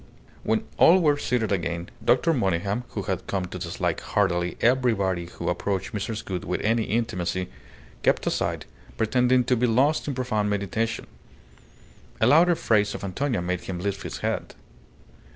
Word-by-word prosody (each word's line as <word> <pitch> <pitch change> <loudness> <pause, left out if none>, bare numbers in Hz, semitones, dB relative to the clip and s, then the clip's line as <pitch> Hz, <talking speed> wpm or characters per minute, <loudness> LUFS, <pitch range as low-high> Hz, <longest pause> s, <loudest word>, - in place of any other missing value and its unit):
When 110 0 0
all 180 +3 +7
were 150 -4 +3
seated 120 -6 0
again, 85 -2 -2
Dr. 130 +8 +3
Monygham, 100 - 0
who 100 - -4
had 95 -1 -3
come 95 -2 -1
to 90 +1 -7
dislike 85 -1 -2
heartily 90 -3 0
everybody 110 -8 +2
who 85 -1 -7
approached 95 +4 -2
Mrs. 105 +1 -4
Gould 90 -2 -4
with 90 - -2
any 115 +1 +1
intimacy, 95 -5 -1 0.5
kept - - +2
aside, - - -1 0.3
pretending 125 +3 +3
to 125 +1 +2
be 125 +1 +2
lost 135 +8 +2
in 140 - -2
profound 110 -5 0
meditation. 105 +3 -2 1.1
A - - +3
louder 165 +7 +6
phrase 105 -8 +1
of - - -7
Antonia 110 +1 -1
made 90 0 -2
him 95 - -5
lift 100 +2 -2
his - - -6
head. - - -2
105 Hz, 155 wpm, -25 LUFS, 95-125 Hz, 1.1 s, all